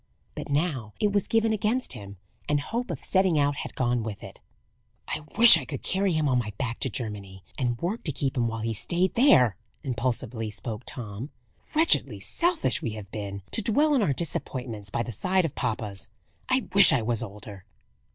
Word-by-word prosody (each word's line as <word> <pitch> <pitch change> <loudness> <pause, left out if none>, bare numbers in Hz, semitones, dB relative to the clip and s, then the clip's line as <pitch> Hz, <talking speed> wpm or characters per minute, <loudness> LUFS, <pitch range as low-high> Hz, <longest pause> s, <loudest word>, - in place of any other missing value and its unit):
But - - -7
now 140 - -1
it 210 - +2
was 205 -2 +1
given 225 -1 +2
against 220 - -1
him; 100 -4 -10 0.3
and 145 0 +2
hope 235 - -4
of - - -5
setting 190 -4 +2
out 145 0 +1
had - - -6
gone 120 -1 0
with 110 -2 -6
it. - - -11 0.7
"I - - -3 0.2
wish 235 +1 +11
I - - -6
could - - -7
carry 190 -1 0
him 155 -2 +1
on 125 -2 +2
my 105 -3 -4
back 120 -2 -3
to 135 - -1
Germany, 100 -5 -6
and 120 -3 -1
work 190 - -3
to 155 - +1
keep 135 -1 -2
him 120 -2 +1
while 115 -1 -4
he 115 +1 -2
stayed 175 - 0
there!" 125 - +5 0.3
impulsively 120 -3 -2
spoke 105 +2 -5
Tom. 115 +2 -6 0.5
"Wretchedly 320 +2 +4
selfish 345 -1 0
we 115 - -3
have 105 -2 -9
been, 100 -2 -6
to - - +3
dwell 285 +8 +3
on 265 - +3
our 170 - +2
disappointments, 125 - -4
by 115 - -1
the 120 - -6
side 185 - +1
of 155 - -3
papa's. 105 -6 -3 0.4
I 255 -3 +1
wish 200 0 +8
I 120 - +2
was 115 -1 -1
older." 100 -2 -9
125 Hz, 195 wpm, -26 LUFS, -, 0.7 s, wish